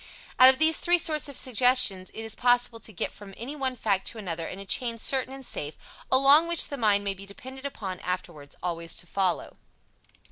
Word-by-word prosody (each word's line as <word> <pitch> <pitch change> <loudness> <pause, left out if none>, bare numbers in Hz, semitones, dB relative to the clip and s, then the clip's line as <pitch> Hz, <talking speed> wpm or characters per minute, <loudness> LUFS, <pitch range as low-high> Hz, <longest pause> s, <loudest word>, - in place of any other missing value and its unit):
Out 255 0 +10
of 260 - +3
these 315 +2 +3
three 350 0 +3
sorts 310 -3 -1
of 280 - -2
suggestion 250 -6 +3
it 225 - -7
is 220 - -4
possible 245 -1 +1
to 225 - -3
get 180 - -4
from 195 -2 -12
anyone 265 +1 -4
fact 200 -5 -1
to - - -4
another 170 -6 -5
in - - -7
a 195 - -8
chain 235 +3 0
certain 260 +3 +1
and 270 0 -9
safe, 150 -7 -5 0.4
along 275 +5 +6
which 340 -1 +3
the 285 - -4
mind 210 -5 +2
may 200 -1 -1
be 195 +1 -12
depended 260 +7 -8
upon 190 -9 -7
afterwards 170 -5 -6
always 170 -2 -3
to - - -4
follow. 185 -1 -2
230 Hz, 205 wpm, -26 LUFS, 190-265 Hz, 0.4 s, Out